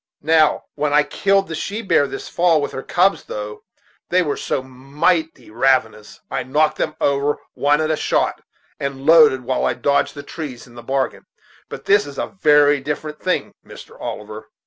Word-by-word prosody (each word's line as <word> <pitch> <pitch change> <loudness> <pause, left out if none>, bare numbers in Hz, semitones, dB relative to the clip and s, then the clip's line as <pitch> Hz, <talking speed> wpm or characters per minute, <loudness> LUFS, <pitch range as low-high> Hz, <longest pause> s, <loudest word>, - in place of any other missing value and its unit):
Now, 155 0 +3
when 150 -1 -1
I 150 0 +5
killed 195 +4 +1
the 165 - -6
she 210 +7 -4
bear 145 -7 +3
this - - -7
fall, 170 -2 +2
with 145 - -3
her 135 - -5
cubs, 185 +7 +1
though 105 0 -6 0.5
they 180 +1 +3
were 145 -3 -2
so 130 - -3
mighty 140 +5 -2
ravenous, 115 -3 0
I - - -1
knocked 150 +4 +1
them 155 - -1
over 140 +1 +1 0.2
one 145 +1 +2
at 155 0 0
a - - +2
shot, - - 0 0.4
and 135 -1 -5
loaded 155 -5 +6
while 130 +1 -1
I - - +1
dodged 140 +1 0
the 145 - -8
trees 140 -8 -8
in 120 - -18
the 120 - -10
bargain; 135 +2 -2 0.4
but - - -9
this 205 -2 +3
is 140 - -10
a - - -4
very 145 -1 +5
different 150 +2 -5
thing, 185 - -2
Mr. - - -13
Oliver." 110 0 -7
145 Hz, 185 wpm, -20 LUFS, 130-160 Hz, 0.5 s, loaded